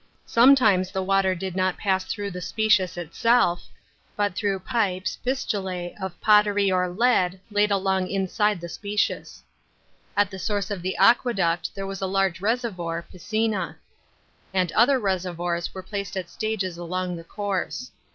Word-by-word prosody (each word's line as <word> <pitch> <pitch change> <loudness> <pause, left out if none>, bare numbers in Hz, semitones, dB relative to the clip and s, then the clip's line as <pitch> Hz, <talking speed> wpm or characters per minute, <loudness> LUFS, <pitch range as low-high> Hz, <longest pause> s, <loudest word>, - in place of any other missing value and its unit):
Sometimes 230 -7 +5
the 190 -1 -2
water 195 -1 +2
did 185 0 -5
not 185 -1 +1
pass 190 -2 0
through 205 -1 -4
the 180 0 -6
spec/is 185 -1 +1
itself, 175 +2 +1 0.5
but 205 -3 0
through 200 0 0
pip 190 -3 0
s - - -3
(/E«/ttJ*»)of 190 -7 -3
pottery 205 -2 +4
or 180 -1 +1
lead 190 -3 +2
laid 205 0 +3
along 190 -2 +1
inside 200 +1 0
the 170 - -5
spccus. 205 +4 -2 0.7
At 205 -1 +3
the 190 - -7
source 205 0 -2
of 200 -3 -3
the 185 +2 -3
aqueduct 195 -8 +3
there 195 - -4
was 195 0 -6
a 190 - 0
large 190 -1 0
reservoir 195 -7 -2
(piscina), 215 +2 -1 0.8
and 180 -3 +2
other 250 +5 +4
reservoirs 175 -5 -2
were 190 - -8
placed 200 0 -5
at 180 -2 -5
stages 195 -6 -3
along 180 +1 -3
the 165 - -8
course. 205 +6 -3
190 Hz, 150 wpm, -25 LUFS, 180-210 Hz, 0.8 s, Sometimes